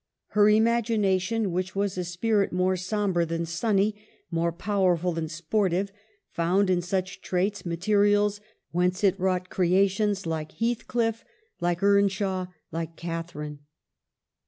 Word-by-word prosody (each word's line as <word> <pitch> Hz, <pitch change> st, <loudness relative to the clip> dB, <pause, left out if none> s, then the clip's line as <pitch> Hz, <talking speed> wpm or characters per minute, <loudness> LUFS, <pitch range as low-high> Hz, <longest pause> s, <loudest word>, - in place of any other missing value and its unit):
Her 210 Hz, 0 st, +5 dB
imagination, 220 Hz, -2 st, +2 dB
which 185 Hz, +2 st, -2 dB
was 200 Hz, -1 st, 0 dB
a 180 Hz, -, -2 dB
spirit 200 Hz, +4 st, 0 dB
more 185 Hz, +1 st, +1 dB
sombre 185 Hz, -1 st, 0 dB
than 165 Hz, 0 st, -2 dB
sunny, 200 Hz, +4 st, +1 dB, 0.4 s
more 170 Hz, 0 st, +1 dB
pow 200 Hz, +4 st, -2 dB
erful 180 Hz, -1 st, +2 dB
than 160 Hz, -1 st, -3 dB
sportive, 185 Hz, +4 st, 0 dB, 0.4 s
found 185 Hz, +3 st, +2 dB
in 180 Hz, -1 st, +2 dB
such 185 Hz, +1 st, -3 dB
traits 190 Hz, +1 st, -1 dB
materials 205 Hz, +3 st, +2 dB, 0.3 s
whence 180 Hz, +3 st, 0 dB
it 195 Hz, -3 st, +5 dB
wrought 185 Hz, 0 st, 0 dB
creations 195 Hz, +2 st, +2 dB
like 160 Hz, -2 st, -3 dB
Heathcliff, 230 Hz, -1 st, -1 dB, 0.4 s
like 175 Hz, +2 st, -1 dB
Earnshaw, 195 Hz, -2 st, +2 dB, 0.2 s
like 165 Hz, 0 st, -4 dB
Catharine. 165 Hz, -3 st, -5 dB
185 Hz, 125 wpm, -26 LUFS, 175-205 Hz, 0.4 s, Her